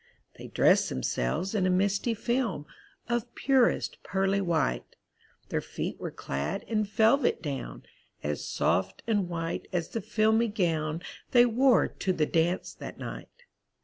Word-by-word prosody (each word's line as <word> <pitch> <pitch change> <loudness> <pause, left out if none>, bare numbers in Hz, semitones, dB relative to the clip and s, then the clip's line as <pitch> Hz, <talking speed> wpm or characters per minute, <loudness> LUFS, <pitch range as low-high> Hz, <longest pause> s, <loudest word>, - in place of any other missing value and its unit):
They - - -8
dressed - - +4
themselves 65 - -1
in 190 -4 +2
a - - +2
misty 200 +5 +1
film 225 - -1 0.4
Of 240 0 -2
purest 265 -3 +2
pearly 195 +1 0
white; 160 - -1 0.5
Their - - -1
feet - - -5
were - - -4
clad 70 +2 -4
in 215 -2 0
velvet 220 +6 +3
down, 140 -6 -5 0.4
As 75 0 -2
soft 95 +2 0
and 205 -6 0
white 165 -1 -3
as 170 -2 -1
the 225 - -3
filmy 220 +3 +2
gown 165 -5 -1 0.3
They 245 -1 +6
wore 245 +1 +4
to 185 - -2
the 155 -3 +1
dance 170 +3 0
that - - -9
night. 485 - -9
195 Hz, 145 wpm, -28 LUFS, 165-225 Hz, 0.5 s, They